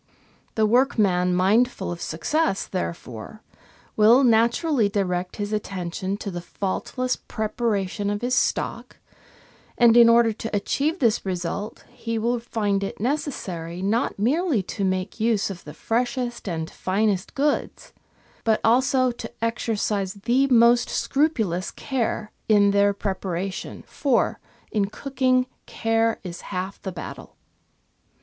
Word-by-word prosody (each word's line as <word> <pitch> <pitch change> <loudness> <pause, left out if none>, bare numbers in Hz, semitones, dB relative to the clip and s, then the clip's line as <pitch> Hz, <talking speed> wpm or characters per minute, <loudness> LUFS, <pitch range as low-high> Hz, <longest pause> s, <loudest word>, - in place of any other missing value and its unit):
The 220 - +3
workman 210 -7 +3
mindful 215 +7 +2
of 175 - -6
success, 245 - 0
therefore, 170 - -6 0.5
will 225 +5 +6
naturally 235 +1 +3
direct 180 -3 -1
his 205 0 -3
attention 190 -1 -3
to 200 - -5
the 175 -1 -5
faultless 205 +8 -2
preparation 210 -3 -2
of 205 0 -2
his 250 +1 0
stock, 245 - -1 0.8
and, 235 -2 +6
in 235 -1 +8
order 230 -1 +5
to 225 0 -5
achieve 285 - 0
this 235 -10 +2
result, 190 +3 -4
he 230 -1 -4
will 235 +2 0
find 205 -4 -1
it 195 - -5
necessary 190 - -3
not 220 +5 0
merely 265 - +1
to 200 +2 -4
make 185 +2 -1
use 220 -3 +1
of 175 -3 -10
the 150 - -8
freshest 240 -1 -2
and 160 -2 -3
finest 195 0 -1
goods, 290 +1 -1 0.5
but 220 -1 +2
also 255 +2 +3
to 230 -1 -8
exercise 215 -4 -1
the 245 +7 +2
most 240 -1 +5
scrupulous 220 - 0
care 230 -4 -3 0.2
in 205 -2 +5
their 200 0 +4
preparation, 190 -2 -4
for, 275 -5 0 0.3
in 205 -2 +1
cooking, 255 +3 0 0.2
care 225 0 0
is 175 -2 -7
half 185 +2 -5
the 190 - -4
battle. 175 - -9
215 Hz, 130 wpm, -24 LUFS, 190-240 Hz, 0.8 s, in